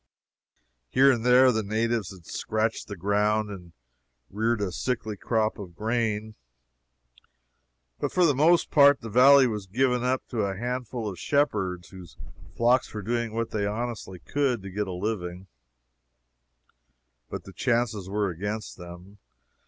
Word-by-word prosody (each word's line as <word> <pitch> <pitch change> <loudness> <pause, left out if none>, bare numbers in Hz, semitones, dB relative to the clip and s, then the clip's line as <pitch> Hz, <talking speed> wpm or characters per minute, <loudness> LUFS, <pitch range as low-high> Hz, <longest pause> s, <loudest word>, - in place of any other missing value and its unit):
Here 135 - +5
and 120 -3 -1
there 125 +1 +6
the 110 -2 0
natives 110 0 -1
had 90 -4 -14
scratched 110 +1 -2
the 100 - -6
ground 105 +3 0
and 90 -4 -10 0.6
reared 110 +3 0
a 100 -3 -2
sickly 110 +1 -3
crop 110 +2 -1
of 90 -4 -9
grain, 110 0 -1 1.7
but - - -2
for 180 -1 +3
the 150 - +4
most 160 +6 +3
part 140 -3 +6
the 115 - -7
valley 135 +4 +7
was 105 -5 -3
given 125 +4 +1
up 130 +1 -1
to 120 - -4
a 100 -2 -2
handful 120 -1 -4
of 95 -4 -6
shepherds, 100 - 0
whose 90 -3 -13 0.4
flocks 120 +2 +2
were 105 -2 -6
doing 115 +1 -1
what 115 0 -2
they 100 -2 -1
honestly 110 -3 -4
could 130 0 -1
to 95 - -7
get 105 +1 -2
a - - -4
living, 90 -1 -4 1.8
but - - -6
the 95 - -12
chances 115 -2 -1
were 100 -1 0
against 105 +6 -5
them. 90 +3 -12
110 Hz, 150 wpm, -26 LUFS, 100-120 Hz, 1.8 s, valley